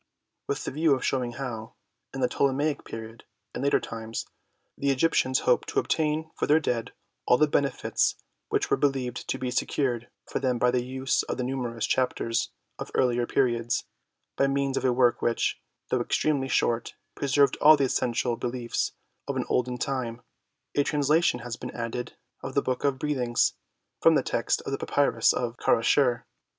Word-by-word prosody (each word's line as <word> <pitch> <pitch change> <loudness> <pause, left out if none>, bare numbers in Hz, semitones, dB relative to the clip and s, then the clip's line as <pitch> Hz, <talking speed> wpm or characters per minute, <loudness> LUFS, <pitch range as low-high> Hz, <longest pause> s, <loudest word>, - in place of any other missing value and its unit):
With 140 - -2
the - - -3
view 150 +1 +3
of 130 - -4
shewing 125 -3 0
how, 120 -4 -6 0.4
in 135 - -5
the 125 - +4
Ptolemaic 140 +3 0
period 115 0 -8 0.3
and - - -4
later 140 - +3
times, 115 0 -5 0.5
the 140 - -1
Egyptians 130 -2 +2
hoped 125 - +2
to - - +1
obtain 155 0 0
for - - -2
their 150 +2 +5
dead 120 -7 -2 0.3
all 125 - +6
the 155 - +4
benefits 140 -1 +1 0.3
which - - 0
were - - +4
believed 130 -3 -1
to - - 0
be 125 -1 -3
secured 125 -2 -1 0.2
for - - -3
them 130 -2 0
by 125 +1 +3
the 125 -1 +1
use 130 +1 0
of - - -4
the 125 - -1
numerous 125 -3 -2
Chap 130 -1 +1
ters 115 0 -1 0.3
of - - -5
earlier 120 -2 +2
periods, 120 -3 +1 0.5
by 140 - +3
means 135 0 0
of - - -1
a 130 - +4
work 120 -1 +3
which, 120 - 0 0.3
though - - +2
extremely 140 -4 0
short, 120 -2 0 0.2
preserved 140 0 +2
all 155 +1 +7
the 140 - +1
essential 120 -2 0
be 125 - -3
liefs 120 -1 -2 0.3
of - - -2
the - - -1
olden 125 0 0
time, 125 -3 -3 0.5
a 145 - +3
translation 145 -2 +2
has 120 -1 -5
been - - -6
added 120 +1 -4 0.2
of 135 - -6
the 140 - +3
"Book 130 -1 -2
of 140 -2 +1
Breathings" 130 -5 +1 0.5
from 165 -1 +6
the 140 - +3
text 115 - 0
of - - -5
the 135 - -2
Pa - - -4
pyrus 145 0 +3
of 120 -1 -2
Kerasher 120 +1 +3
(Brit. - - -34
130 Hz, 185 wpm, -27 LUFS, 120-140 Hz, 0.5 s, all